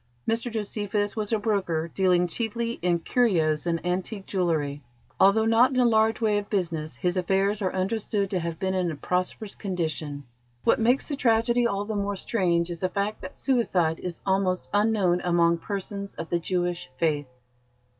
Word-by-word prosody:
Mr 230 Hz, +2 st, 0 dB
Josephus 205 Hz, -1 st, -2 dB
was 215 Hz, -1 st, -2 dB
a 225 Hz, -, +3 dB
broker 190 Hz, -7 st, 0 dB
dealing 180 Hz, -2 st, +3 dB
chiefly 230 Hz, +5 st, -3 dB
in 175 Hz, 0 st, +2 dB
curios 165 Hz, -6 st, +1 dB
and 165 Hz, 0 st, -1 dB
antique 190 Hz, +3 st, -2 dB
jewellery. 155 Hz, -6 st, -1 dB, 0.4 s
Although 210 Hz, +3 st, +5 dB
not 230 Hz, +3 st, +5 dB
in -, -, +2 dB
a 250 Hz, -, +5 dB
large 220 Hz, -1 st, +3 dB
way 215 Hz, -3 st, +2 dB
of 205 Hz, -, -9 dB
business, 165 Hz, -6 st, -2 dB
his 180 Hz, -1 st, -1 dB
affairs 195 Hz, +3 st, +1 dB
are 185 Hz, -, 0 dB
understood 200 Hz, +1 st, -1 dB
to 185 Hz, -, +1 dB
have 170 Hz, -1 st, -4 dB
been 190 Hz, +2 st, -1 dB
in 185 Hz, -2 st, 0 dB
a 160 Hz, -, -4 dB
prosperous 180 Hz, +7 st, -2 dB
condition. 160 Hz, -6 st, -3 dB, 0.4 s
What 255 Hz, -, +3 dB
makes 245 Hz, +4 st, +2 dB
the 290 Hz, -, -2 dB
tragedy 235 Hz, -1 st, +3 dB
all 200 Hz, -1 st, -2 dB
the 220 Hz, -, -3 dB
more 200 Hz, 0 st, -1 dB
strange 175 Hz, -4 st, 0 dB
is 170 Hz, -, -5 dB
the 185 Hz, -, 0 dB
fact 200 Hz, +3 st, -2 dB
that -, -, -9 dB
suicide 185 Hz, -, +1 dB
is 175 Hz, -2 st, -5 dB
almost 190 Hz, -1 st, 0 dB
unknown 205 Hz, -4 st, +2 dB
among 170 Hz, -1 st, +3 dB
persons 200 Hz, +1 st, -4 dB
of 165 Hz, -, -7 dB
the 175 Hz, -, +2 dB
Jewish 175 Hz, 0 st, -2 dB
faith." 150 Hz, -4 st, 0 dB
190 Hz, 175 wpm, -26 LUFS, 175-220 Hz, 0.4 s, Although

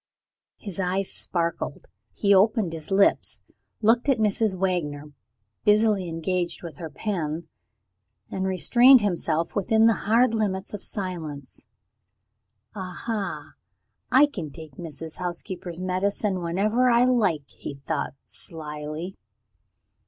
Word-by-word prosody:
His 195 Hz, -3 st, -7 dB
eyes 190 Hz, +1 st, 0 dB
sparkled 170 Hz, -2 st, -1 dB, 0.3 s
he 200 Hz, -1 st, +2 dB
opened 200 Hz, -2 st, +3 dB
his 160 Hz, -2 st, -7 dB
lips 195 Hz, 0 st, +3 dB, 0.5 s
looked 235 Hz, +5 st, +4 dB
at 270 Hz, -, +4 dB
Mrs. 215 Hz, -2 st, +1 dB
Wagner, 150 Hz, -6 st, -2 dB, 0.5 s
busily 210 Hz, -3 st, +3 dB
engaged 175 Hz, +2 st, -2 dB
with 165 Hz, -4 st, -8 dB
her 160 Hz, -1 st, -6 dB
pen 160 Hz, -1 st, -3 dB, 0.8 s
and 190 Hz, 0 st, -1 dB
restrained 240 Hz, +8 st, +6 dB
himself 170 Hz, -4 st, -1 dB
within 220 Hz, +3 st, +3 dB
the 225 Hz, -, +6 dB, 0.2 s
hard 235 Hz, +1 st, +4 dB
limits 200 Hz, -3 st, -1 dB
of 205 Hz, -, -5 dB
silence. 160 Hz, -, -6 dB, 1.1 s
"Aha! 195 Hz, +2 st, -4 dB, 0.6 s
I 270 Hz, +3 st, +7 dB
can 185 Hz, -, -6 dB
take 155 Hz, 0 st, -11 dB
Mrs. 160 Hz, -1 st, -8 dB
Housekeeper's 175 Hz, 0 st, -5 dB
medicine 185 Hz, +1 st, -1 dB
whenever 210 Hz, +9 st, +2 dB
I 240 Hz, +1 st, +5 dB
like," 200 Hz, -, +2 dB
he 140 Hz, -, -8 dB
thought 140 Hz, +1 st, -3 dB
slily. 155 Hz, +2 st, -3 dB
185 Hz, 115 wpm, -25 LUFS, 165-210 Hz, 1.1 s, I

